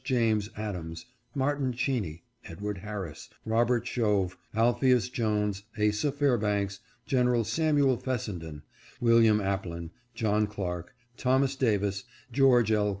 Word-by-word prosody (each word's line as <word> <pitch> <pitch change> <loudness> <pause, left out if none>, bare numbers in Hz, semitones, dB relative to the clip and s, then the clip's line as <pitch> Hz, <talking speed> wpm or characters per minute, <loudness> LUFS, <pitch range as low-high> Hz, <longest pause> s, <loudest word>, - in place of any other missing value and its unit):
James 115 -5 +1
Adams, 85 -6 -5 0.3
Martin 140 -1 0
Cheeney, 110 - -2 0.2
Edward 100 +2 -5
Harris, 100 -5 -6 0.2
Robert 115 +1 +2
Shove, 105 -7 0 0.2
Alpheus 120 +2 +3
Jones, 105 -5 0 0.2
Asa 105 +7 +2
Fairbanks, 105 -8 0 0.3
Gen. 125 -3 +2 0.2
Sam'l 145 -2 +2
Fessenden, 85 - -4 0.4
William 115 -2 +5
Aplin, 90 -4 -3 0.2
John 105 -1 +1
Clark, 90 -3 -5 0.2
Thomas 135 +1 +2
Davis, 105 -4 0 0.3
George 125 -5 +4
L. 105 -1 +2
110 Hz, 105 wpm, -29 LUFS, 100-125 Hz, 0.4 s, William